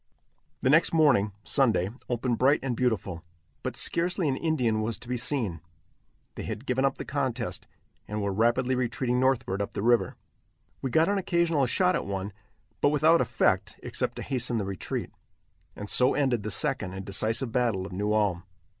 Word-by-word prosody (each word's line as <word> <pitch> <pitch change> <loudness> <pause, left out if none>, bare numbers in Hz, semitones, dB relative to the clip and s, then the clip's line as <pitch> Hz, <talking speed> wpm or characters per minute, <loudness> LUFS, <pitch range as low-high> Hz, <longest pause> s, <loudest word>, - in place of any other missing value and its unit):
The 130 - +2
next 160 +3 +4
morning 140 -11 +4
(Sunday) 110 -9 +2 0.2
opened 120 -1 -1
bright 135 +4 +4
and 130 -3 -1
beautiful, 100 -9 -1 0.4
but - - -4
scarcely 175 0 +1
an 135 - +1
Indian 125 -9 0
was 110 0 -1
to 125 - -11
be 125 - -2
seen. 115 - 0 0.7
They - - -7
had 115 - -6
given 130 +1 +1
up 135 - 0
the - - -6
contest, 125 -9 -3 0.4
and 105 +1 -3
were 100 -1 -1
rapidly 120 +5 +2
retreating 125 0 0
northward 125 -7 +1
up 100 - -4
the 100 - -3
river. 120 0 +2 0.7
We 135 - -2
got 160 +6 +3
an 200 0 +1
occasional 170 -6 +1
shot 180 +7 +2
at - - -3
one, 100 0 -4 0.5
but - - +5
without 155 +3 +4
effect - - 0
except - - -2
to - - -6
hasten 125 -2 -2
the 105 - -1
retreat. 95 -4 -4 0.6
And 105 - -7
so 125 +4 +3
ended 130 -6 +1
the 105 - -4
second 130 -7 0
and 95 0 -6
decisive 110 +5 0
battle 115 -6 0
of - - -8
New 105 +3 -1
Ulm. 105 -5 +1
120 Hz, 180 wpm, -27 LUFS, 105-135 Hz, 0.7 s, but